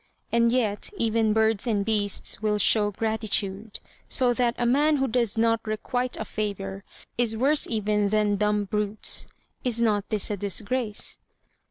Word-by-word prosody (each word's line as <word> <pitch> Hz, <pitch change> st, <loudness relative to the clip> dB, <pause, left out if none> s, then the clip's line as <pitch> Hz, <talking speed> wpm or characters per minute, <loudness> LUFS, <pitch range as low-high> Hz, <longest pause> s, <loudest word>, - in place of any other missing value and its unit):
And 235 Hz, 0 st, +3 dB
yet 220 Hz, -5 st, 0 dB
even 225 Hz, -3 st, +1 dB
birds 220 Hz, +1 st, +1 dB
and 205 Hz, -3 st, 0 dB
beasts 210 Hz, -2 st, 0 dB
will 210 Hz, -1 st, +1 dB
show 210 Hz, 0 st, +3 dB
gratitude; 215 Hz, -1 st, -2 dB, 0.3 s
so 250 Hz, -2 st, +2 dB
that 240 Hz, -1 st, 0 dB
a 240 Hz, -, -1 dB
man 290 Hz, +5 st, +3 dB
who 270 Hz, 0 st, 0 dB
does 235 Hz, -3 st, 0 dB
not 230 Hz, 0 st, +2 dB
requite 245 Hz, +4 st, -2 dB
a 220 Hz, -, -4 dB
favour 195 Hz, -2 st, -5 dB, 0.4 s
is 225 Hz, -2 st, +1 dB
worse 280 Hz, +5 st, +3 dB
even 210 Hz, -2 st, 0 dB
than 210 Hz, 0 st, +1 dB
dumb 210 Hz, 0 st, +1 dB
brutes. 210 Hz, +1 st, -1 dB, 0.4 s
Is 240 Hz, -2 st, +1 dB
not 210 Hz, -3 st, +1 dB
this 210 Hz, -1 st, +2 dB
a 205 Hz, -, -2 dB
disgrace? 210 Hz, +3 st, -1 dB
220 Hz, 155 wpm, -25 LUFS, 205-235 Hz, 0.4 s, And